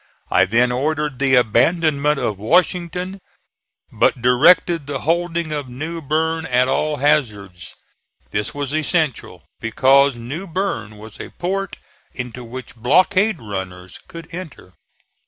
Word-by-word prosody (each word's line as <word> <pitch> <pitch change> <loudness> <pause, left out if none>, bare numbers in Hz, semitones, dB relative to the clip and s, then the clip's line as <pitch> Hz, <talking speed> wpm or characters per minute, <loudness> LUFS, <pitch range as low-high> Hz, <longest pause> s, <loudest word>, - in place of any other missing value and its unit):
I - - +5
then 120 +4 +2
ordered 150 +1 -1
the 135 -1 +3
abandonment 145 +5 +2
of 105 -7 -2
Washington, 180 - 0 0.7
but - - +2
directed 145 +5 +4
the 145 -1 -4
holding 170 0 -1
of 145 -3 -4
New 155 +7 -5
Berne 160 +2 -1
at 125 0 +2
all 150 +3 0
hazards. 105 - -1 0.6
This 105 0 -2
was 145 -1 -4
essential 155 - -1 0.2
because 135 +4 +3
New 140 +11 -6
Berne 170 - -3
was 110 0 -12
a - - -7
port 195 +2 -4 0.4
into 125 0 -6
which 125 +2 -9
blockade 185 - +2
runners 95 -4 -7
could 165 -1 -10
enter. 160 - -9
140 Hz, 125 wpm, -20 LUFS, 120-165 Hz, 0.7 s, I